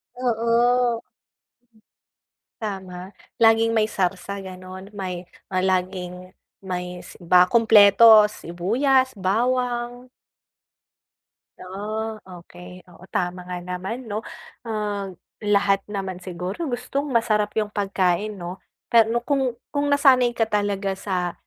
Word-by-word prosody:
Oo. 240 0 +1 1.6
Tama. 190 -2 -6 0.2
Laging 225 0 +5
may 215 - +4
sarsa, 195 0 -2
gano'n. 185 +1 -10
May, 185 -4 -6 0.2
ah, 185 - +1
laging 185 -1 -2 0.3
may 180 -1 -5
s - - -12
ba 180 +1 +5
kumpleto. 220 0 +7
Sibuyas, 235 - 0
bawang. 245 +4 -1 1.5
Oh, 215 +3 -5
okey, 180 0 -13
oo. 180 - -19
Tama 180 0 -2
nga 180 - -3
naman 180 +7 -5
'no. 215 0 -4 0.4
Ah, 210 -3 -3 0.3
lahat 200 -1 +2
naman 190 -3 -5
siguro 185 - -5
gustong 260 +4 -3
masarap 215 -4 +1
yung 210 -1 -1
pagkain 195 +1 0
'no. 175 +2 -7 0.3
Pero 230 0 +5
kung 265 -4 0 0.2
kung 285 0 0
nasanay 260 -4 +4
ka 225 - +3
talaga 205 -2 -1
sa 180 -3 -3
205 Hz, 105 wpm, -23 LUFS, 185-230 Hz, 1.6 s, kumpleto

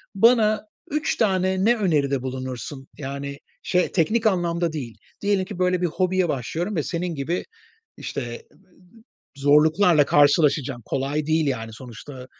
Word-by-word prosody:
Bana 215 0 +4 0.3
3 300 +2 -1
tane 190 -2 +1
ne 235 +2 +5
öneride 145 - +1
bulunursun? 130 +1 -6
Yani, 140 0 -5 0.3
şey, 180 0 +1
teknik 220 +6 +2
anlamda 170 -3 0
değil. 125 -7 -6 0.2
Diyelim 200 -2 +1
ki, 190 -1 -8
böyle, 180 -1 +1
bir 180 - +2
hobiye 185 +1 0
başlıyorum 165 - -2
ve 155 - 0
senin 170 +1 -3
gibi, 150 +6 -2 0.5
işte, 120 -3 -5 0.9
zorluklarla 150 +3 +4
karşılaşacağım. 145 -3 +3
Kolay 140 +3 -2
değil, 160 0 +2
yani, 115 -5 -3
sonuçta 125 +3 -10
160 Hz, 130 wpm, -23 LUFS, 140-185 Hz, 0.9 s, ne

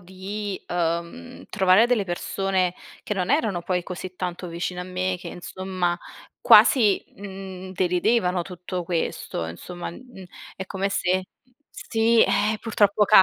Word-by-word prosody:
di, 190 +2 -5
uhm, 175 +9 -3
trovare 190 +2 +5
delle 240 -4 +2
persone 185 0 -1 0.3
che 210 - -2
non 185 +4 -1
erano 220 - +1
poi 180 -1 -1
così 180 +1 -7
tanto 180 0 -4
vicine 175 +2 -4
a - - -3
me, 185 0 -2
che - - -8
insomma 185 -1 -3 0.4
quasi, 215 -8 +6
mhmm, 190 -1 -8
deridevano 180 0 +1
tutto 180 0 -5
questo 165 - -2
insomma, 175 - -7
mhmm, 220 -1 -12 0.3
è 190 - -6
come 195 0 -2
se 185 -1 0 0.4
sì 225 +1 +2
,ehm, 215 +1 +2
purtroppo 210 -2 +3
capita, 205 -2 +8
185 Hz, 135 wpm, -24 LUFS, 180-205 Hz, 0.4 s, capita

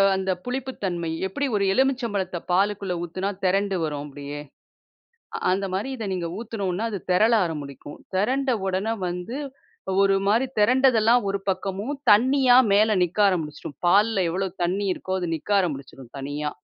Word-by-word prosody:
அந்த 190 0 -1
புளிப்பு 260 +1 -3
தன்மை. 170 -3 -2 0.2
எப்படி 280 +10 -2
ஒரு 200 - +1
எலுமிச்சபழத்த 235 -9 0
பாலுக்குள்ள 195 0 +1
ஊத்துனா 185 +4 -3 0.2
திரண்டு 195 +1 +1
வரும் 145 -2 -3
அப்படியே. 145 0 -7 1.0
அ - - -4
அந்த 195 +1 0
மாரி 200 +7 -2
இதை 220 -3 -5
நீங்க 175 -2 -2
ஊத்துனோம்னா, 210 -3 -3
அது 200 - -3
திரள 215 +6 +4
ஆரம்பிக்கும். 145 -3 -7 0.2
திரண்ட 260 +7 +1 0.2
உடனே 190 +4 -1 0.2
வந்து, 180 +8 -5 0.7
ஒரு 195 0 +4
மாதிரி 235 +6 +3
திரண்டதெல்லாம் 240 -1 +4
ஒரு 200 - -1
பக்கமும், 195 +8 -3 0.2
தண்ணியா 255 +3 +5 0.2
மேல 215 0 +4
நிக்க 180 +4 -2
ஆரம்பிச்சுரும். 150 -5 -3
பால்ல 200 +1 +4
எவ்ளோ 190 +2 -1 0.2
தண்ணி 195 +3 -1
இருக்கோ, 190 - -4
அது 175 - -2
நிக்க 160 - -11
ஆரம்பிச்சிரும், 135 -6 -5
தனியா. 145 +2 -4
195 Hz, 145 wpm, -24 LUFS, 175-225 Hz, 1.0 s, தண்ணியா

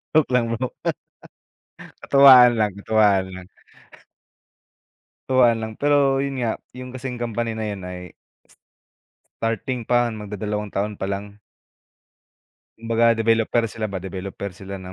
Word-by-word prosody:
Joke 155 -4 +3
lang 120 -2 +2
bro. 120 +2 -3 1.3
Katuwaan 130 -3 +8
lang, 105 -2 +1
katuwaan 105 -4 +3
lang. 90 -1 -10 1.8
Katuwaan 125 -3 +4
lang 110 0 -5
pero 140 0 +2
'yun 140 -1 -3
nga, 115 -3 -1 0.2
yung 125 0 -10
kasing 130 -1 -6
company 120 -1 -2
na 110 - -3
'yon 100 -2 -5
ay 90 -1 -8 1.3
starting 115 +2 -2
pa, 120 +1 +2
magdadalawang 105 -1 -5
taon 105 +1 -2
pa - - -5
lang. 100 +1 -5 1.4
Kumbaga 115 +1 +2
developer 115 +1 +1
sila 110 -1 -4
ba. 100 - -5
Developer 95 +2 -6
sila 100 +1 -8
ng 95 -1 -9
115 Hz, 125 wpm, -22 LUFS, 100-125 Hz, 1.8 s, Katuwaan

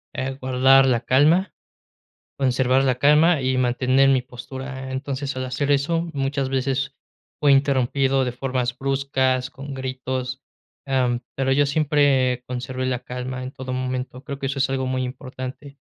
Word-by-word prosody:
eh, 130 +1 -3
guardar 130 +1 +5
la 125 -2 +2
calma, 155 - +3 0.9
conservar 130 0 +2
la 130 -2 +2
calma 150 +3 +5
y 130 0 0
mantener 130 +2 +3
mi 130 - +3
postura. 130 +2 -8
Entonces, 135 +1 -3
al 130 - -2
hacer 135 +3 -2
eso, 145 +4 +2
muchas 135 -1 -1
veces 135 +1 -1 0.5
fui 145 -1 +5
interrumpido 135 -1 +2
de 125 - -2
formas 125 -1 -2
bruscas, 130 -1 0
con 140 +1 -8
gritos, 130 0 -4 0.4
am, 125 -3 +1
pero 135 0 0
yo 145 +2 +4
siempre 140 -4 +2
conservé 130 +1 -4
la 125 -2 -1
calma 125 +1 -5
en 130 - -6
todo 130 -2 -6
momento, 130 0 -3
creo 140 -2 -6
que 135 - -3
eso 135 +1 -3
es 135 - +2
algo 130 -1 -1
muy 130 0 -1
importante. 130 +2 -7
130 Hz, 155 wpm, -23 LUFS, 130-140 Hz, 0.9 s, guardar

